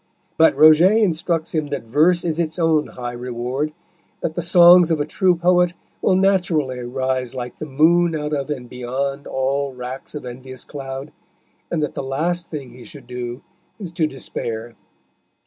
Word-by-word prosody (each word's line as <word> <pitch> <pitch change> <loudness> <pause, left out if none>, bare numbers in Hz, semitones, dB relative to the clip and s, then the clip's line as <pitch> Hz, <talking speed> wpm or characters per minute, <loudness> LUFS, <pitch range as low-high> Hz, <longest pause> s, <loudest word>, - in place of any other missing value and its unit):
But 160 -3 +5
Roget 160 +9 +6
instructs 165 -3 -1
him 155 -2 -1
that - - -4
Verse 155 +10 +2
is 165 -1 -1
its 160 -1 -1
own 160 -3 +2
high 120 -1 -6
reward, 125 +4 -3 0.5
that 160 - -2
the 175 - -2
songs 175 0 +7
of 160 -2 +1
a 145 - 0
true 180 +3 +2
poet 175 +1 +2 0.3
will 185 - +3
naturally 180 -9 +1
arise 130 +1 -2
like 125 -1 -6
the 155 - -6
moon 165 +4 +3
out 150 0 -3
of 140 -1 -2
and 130 -5 -4
beyond 135 +3 -4
all 135 +1 -1
racks 125 +4 -7
of 145 - -6
envious 130 +1 -8
cloud, 135 0 -7 0.6
and 160 -3 -1
that 150 - -2
the - - -4
last 165 +6 -2
thing 140 -6 -7
he 125 0 -13
should 145 -4 -12
do 125 0 -6 0.3
is 190 -6 -7
to 165 -2 0
despair. 115 -4 -5
150 Hz, 170 wpm, -21 LUFS, 130-170 Hz, 0.6 s, songs